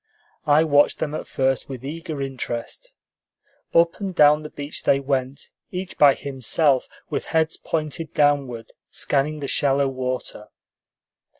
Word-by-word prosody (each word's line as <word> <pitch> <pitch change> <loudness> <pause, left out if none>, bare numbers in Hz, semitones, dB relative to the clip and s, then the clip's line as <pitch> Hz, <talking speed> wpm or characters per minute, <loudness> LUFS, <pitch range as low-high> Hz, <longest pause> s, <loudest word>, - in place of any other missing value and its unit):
I 150 +2 +5
watched 145 -2 +3
them 150 - -3
at - - -5
first 135 0 0
with 130 -1 -7
eager 155 -1 -5
interest. 135 - -6 0.8
Up 170 0 +3
and 195 -3 -4
down 150 -1 +6
the 150 - -8
beach 145 0 -7
they 140 - +3
went, 135 -1 -3 0.2
each 185 0 -5
by 140 -2 +7
himself, 135 +1 +1 0.2
with - - -2
heads 160 0 +1
pointed 155 0 -3
downward, 140 -6 +1 0.2
scanning 150 +2 -1
the 140 - -3
shallow 140 -1 +2
water. 130 -4 -4
145 Hz, 135 wpm, -23 LUFS, 135-155 Hz, 0.8 s, by